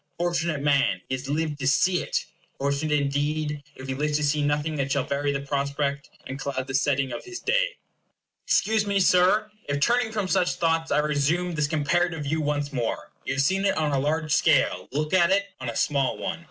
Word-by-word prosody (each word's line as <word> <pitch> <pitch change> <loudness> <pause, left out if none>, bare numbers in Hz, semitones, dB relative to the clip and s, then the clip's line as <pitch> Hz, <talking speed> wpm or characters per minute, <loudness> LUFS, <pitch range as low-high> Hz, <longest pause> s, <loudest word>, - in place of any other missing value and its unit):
Fortunate 170 -3 -1
man, 140 -1 +2
he - - -2
has 130 +1 -4
lived 150 0 -1
to 135 - -1
see 180 +6 +3
it! - - -2 0.3
Fortunate, 140 +2 0
indeed, 145 +1 -1
if 130 - -9
he 135 - -2
lives 150 +2 0
to 150 - -2
see 145 +1 +1
nothing 145 +2 0
that 140 -1 -1
shall - - +1
vary 145 +1 -1
the 140 -1 -2
prospect, 140 0 -2 0.2
and 135 +1 -6
cloud 135 -1 -3
the 135 - -7
setting 135 -1 +1
of - - -5
his 370 0 -7
day! - - +1 0.7
Excuse 215 -1 +2
me, 200 -1 +2
Sir, 190 +4 +4 0.2
if 145 0 0
turning 235 +6 +2
from 210 -3 -2
such 180 -1 +1
thoughts 165 -1 0
I - - +3
resume 150 +4 +1
this 150 -2 0
comparative 160 +2 0
view 155 +3 -1
once 145 -1 -2
more. 120 -4 -3
You 130 - -1
have 135 - +2
seen 190 +6 +1
it 200 - +1
on 155 -2 +1
a 140 - +1
large 155 +2 0
scale; 130 - +2
look 150 +4 -2
at 175 -2 +5
it 200 +1 +2
on 130 -2 -4
a 115 - -5
small 140 -3 +1
one. - - -4
150 Hz, 210 wpm, -25 LUFS, 140-170 Hz, 0.7 s, at